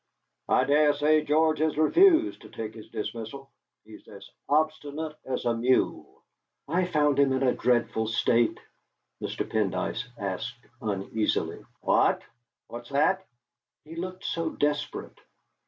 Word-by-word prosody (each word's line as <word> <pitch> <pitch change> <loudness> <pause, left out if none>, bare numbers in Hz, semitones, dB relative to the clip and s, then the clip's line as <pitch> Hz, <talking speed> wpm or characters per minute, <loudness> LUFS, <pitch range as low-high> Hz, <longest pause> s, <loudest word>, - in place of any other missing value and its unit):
"I - - +4
dare 150 +1 +4
say 150 +2 +3
George 155 +1 +2
has 155 -1 +1
refused 335 - +4
to - - -13
take 110 -1 -6
his 110 -1 -12
dismissal. 115 +5 -6 0.3
He's - - -14
as - - -12 0.2
obstinate 155 0 0
as 130 -1 -3
a 120 - +2
mule." 120 +3 0 0.4
"I 175 +5 +1
found 150 -5 +2
him 140 -1 +4
in 130 0 0
a 125 - +3
dreadful 120 -2 +1
state." 115 +1 +2 0.6
Mr. - - -3
Pendyce 110 +2 -1
asked 115 +5 -5 0.2
uneasily: 105 +1 -1 0.2
"What? - - +3 0.4
What's 120 0 -9
that?" 185 +7 +1 0.6
"He 160 +2 -10
looked 185 +2 -6
so 165 -1 -1
desperate." 145 -1 -2
145 Hz, 130 wpm, -27 LUFS, 115-155 Hz, 0.6 s, I